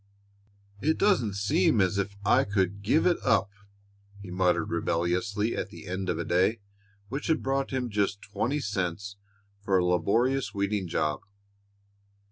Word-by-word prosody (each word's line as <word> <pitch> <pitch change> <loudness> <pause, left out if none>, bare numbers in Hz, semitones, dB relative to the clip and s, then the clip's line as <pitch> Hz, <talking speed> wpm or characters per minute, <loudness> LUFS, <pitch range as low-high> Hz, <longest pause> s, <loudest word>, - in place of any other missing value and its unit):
"It 160 +2 +1
doesn't 125 - +2
seem 100 +1 +2
as 95 +1 +2
if 100 0 -2
I - - +4
could 100 0 -1
give 130 +11 +2
it 180 - +3
up!" 115 -5 +2 0.7
he 100 -3 -9
muttered 90 -1 +1
rebelliously 90 +6 0
at - - -3
the - - -11
end 95 +1 -3
of 85 - 0
a 85 - -3
day 95 +6 +2 0.5
which 135 +4 -4
had 160 -2 +1
brought 135 +1 0
him 130 -2 -2
just 100 -2 -1
twenty 130 +8 -2
cents 100 -1 -3 0.4
for 100 -1 +1
a 90 - +2
laborious 115 +10 +1
weeding 100 -1 -1
job. 75 -2 -1
100 Hz, 150 wpm, -28 LUFS, 90-115 Hz, 0.7 s, I